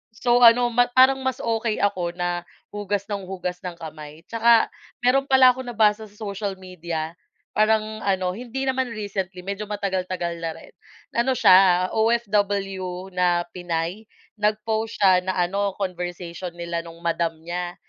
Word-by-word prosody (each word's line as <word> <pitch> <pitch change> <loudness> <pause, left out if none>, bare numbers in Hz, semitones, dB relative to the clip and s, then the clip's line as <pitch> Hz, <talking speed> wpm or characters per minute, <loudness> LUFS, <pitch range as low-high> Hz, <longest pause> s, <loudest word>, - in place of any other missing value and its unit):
So 240 +1 +2
ano, 240 +1 +7
ma 245 +1 +3
parang 260 +1 +6
mas 260 -1 -1
okey 225 -1 -1
ako 175 -4 0
na 175 -1 -2 0.3
hugas 205 -1 -2
ng 200 -2 -4
hugas 180 -1 -4
ng 180 -1 -5
kamay. 155 -1 -9
'Tsaka 230 0 +4 0.3
meron 270 +2 +3
pala 260 -1 +7
akong 260 0 -8
nabasa 220 -2 +2
sa 205 - -23
social 200 -2 -4
media, 170 -4 -5 0.4
parang 215 0 +1
ano, 185 -2 0
hindi 250 +3 -5
naman 260 0 0
recently, 190 -3 -4
medyo 200 +2 -4
matagal-tagal 185 -4 -3
na 165 -1 -3
rin. - - -14 0.4
Ano 255 +2 +2
siya, 185 -2 +6
OFW 200 -5 0
na 180 -1 +2
Pinay. 175 +4 -4 0.3
Nag-post 220 +1 -1
siya 185 -2 +6
na 185 0 -2
ano, 195 +2 0
conversation 180 -2 -5
nila 170 0 -3
nung 165 0 -11
madam 170 -1 0
niya. 175 +1 -4
195 Hz, 150 wpm, -23 LUFS, 180-220 Hz, 0.4 s, ano